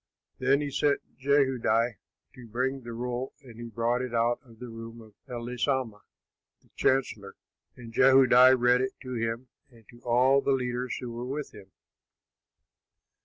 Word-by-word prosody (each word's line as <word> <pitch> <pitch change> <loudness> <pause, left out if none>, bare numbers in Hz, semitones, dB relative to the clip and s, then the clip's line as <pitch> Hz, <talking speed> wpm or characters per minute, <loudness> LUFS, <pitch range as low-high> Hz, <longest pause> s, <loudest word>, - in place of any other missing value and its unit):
Then 135 +3 +2
he 145 -1 -3
sent 145 +1 +1 0.2
Jehudi 130 -5 +2 0.4
to 125 -2 -13
bring 130 +4 -2
the 120 -1 -8
roll, 125 +2 -4
and 120 -3 -13
he 120 - -6
brought 120 +2 0
it 125 -2 -4
out 115 +1 +1
of 115 -4 -18
the 125 - -8
room 115 0 -9
of 110 -2 -15 0.2
Elishama, 120 -1 -2 0.6
the - - -29
chancellor. 110 -7 0 0.4
And 115 -2 -11
Jehudi 130 0 +6
read 125 +1 +4
it 130 0 -2
to 130 -1 -6
him 115 +1 -3 0.2
and 115 -4 -21
to 120 - -16
all 130 +3 +3
the 140 - +1
leaders 125 -1 -2
who 125 -2 -6
were 120 +1 -6
with 145 +2 -5
him. 100 -3 -15
125 Hz, 160 wpm, -28 LUFS, 115-130 Hz, 0.6 s, Jehudi